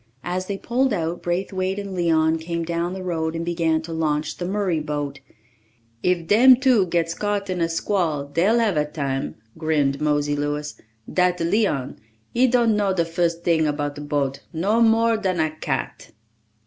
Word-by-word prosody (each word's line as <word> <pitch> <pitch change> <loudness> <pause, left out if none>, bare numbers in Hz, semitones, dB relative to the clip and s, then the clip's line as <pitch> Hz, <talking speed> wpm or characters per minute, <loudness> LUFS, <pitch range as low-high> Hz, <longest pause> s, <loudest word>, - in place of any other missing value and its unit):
As 185 +1 -3
they 200 - -3
pulled 250 +3 0
out, 170 -2 -2
Braithwaite 185 +2 -2
and 200 -1 -5
Leon 165 -2 +2
came 170 +1 -3
down 170 +1 -2
the 190 0 -6
road 160 -2 -2
and 165 0 -3
began 165 -2 0
to 165 0 -6
launch 155 -2 -1
the 175 - -4
Murray 190 -4 0
boat. 145 -2 -4 0.8
"If 180 -2 +1
dem 245 +8 +7
two 245 -7 +3
gits 165 -1 0
caught 205 -1 -2
in 180 -1 -2
a 165 - +1
squall 165 -4 -1
dey'll 175 +10 +2
hav 220 -8 +1
a 150 - +2
tam," 140 -3 -3 0.2
grinned 150 -4 +1
Mosey 145 -1 +1
Louis. 145 0 -2 0.4
"Dat 180 -1 +2
Leon, 170 - 0 0.3
he 255 +2 +4
don't 235 -3 +3
know 200 -2 +1
de 170 -2 +1
fust 170 0 -1
ting 160 -3 +2
'bout 145 -1 -3
a 145 - -7
boat, 145 -2 -1
no 200 +7 +1
more 230 0 +4
dan 190 -5 -1
a 155 -1 +1
cat!" 155 - -4
170 Hz, 175 wpm, -23 LUFS, 155-195 Hz, 0.8 s, dem